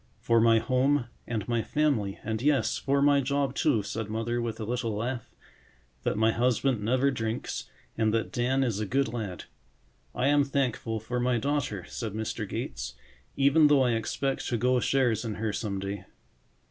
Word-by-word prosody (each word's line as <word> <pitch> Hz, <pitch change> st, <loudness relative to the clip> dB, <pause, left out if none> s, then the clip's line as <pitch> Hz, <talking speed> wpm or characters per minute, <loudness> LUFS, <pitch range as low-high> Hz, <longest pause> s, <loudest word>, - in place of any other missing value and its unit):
"For 115 Hz, -1 st, +3 dB
my 115 Hz, 0 st, +5 dB
home 130 Hz, +3 st, +2 dB, 0.2 s
and 110 Hz, -4 st, -3 dB
my 120 Hz, -1 st, +1 dB
family, 125 Hz, -9 st, 0 dB
and 110 Hz, +1 st, -2 dB
yes—for 140 Hz, 0 st, +2 dB
my 145 Hz, -1 st, +5 dB
job, 140 Hz, 0 st, 0 dB
too," 135 Hz, -7 st, +2 dB
said 105 Hz, +1 st, -4 dB
Mother 115 Hz, +2 st, -1 dB
with 115 Hz, -1 st, -4 dB
a -, -, -3 dB
little 115 Hz, -1 st, -2 dB
laugh. 120 Hz, +3 st, -3 dB, 0.7 s
"That -, -, -1 dB
my 110 Hz, +1 st, +4 dB
husband 125 Hz, 0 st, +1 dB
never 130 Hz, +6 st, +2 dB
drinks 115 Hz, -2 st, -3 dB, 0.3 s
and 110 Hz, -1 st, +2 dB
that 115 Hz, 0 st, -1 dB
Dan 130 Hz, +3 st, +1 dB
is 115 Hz, -6 st, -1 dB
a 105 Hz, -, -2 dB
good 135 Hz, 0 st, 0 dB
lad." 105 Hz, -7 st, -4 dB, 0.7 s
"I 125 Hz, -, 0 dB
am 145 Hz, 0 st, +4 dB
thankful 125 Hz, -5 st, -1 dB
for 120 Hz, +3 st, -3 dB
my 125 Hz, 0 st, +2 dB
daughter," 115 Hz, -7 st, -1 dB
said 110 Hz, -4 st, -5 dB
Mr. 110 Hz, 0 st, -3 dB
Gates, 65 Hz, +1 st, -4 dB, 0.4 s
"even 145 Hz, +3 st, +5 dB
though 145 Hz, -2 st, +5 dB
I 125 Hz, -, +2 dB
expect 135 Hz, +4 st, -1 dB
to 120 Hz, -, 0 dB
go 125 Hz, +2 st, +2 dB
shares 125 Hz, -5 st, +1 dB
in 110 Hz, -3 st, -3 dB
her 110 Hz, 0 st, -2 dB
some 100 Hz, -3 st, -3 dB
day." 100 Hz, +1 st, -5 dB
120 Hz, 175 wpm, -28 LUFS, 110-135 Hz, 0.7 s, my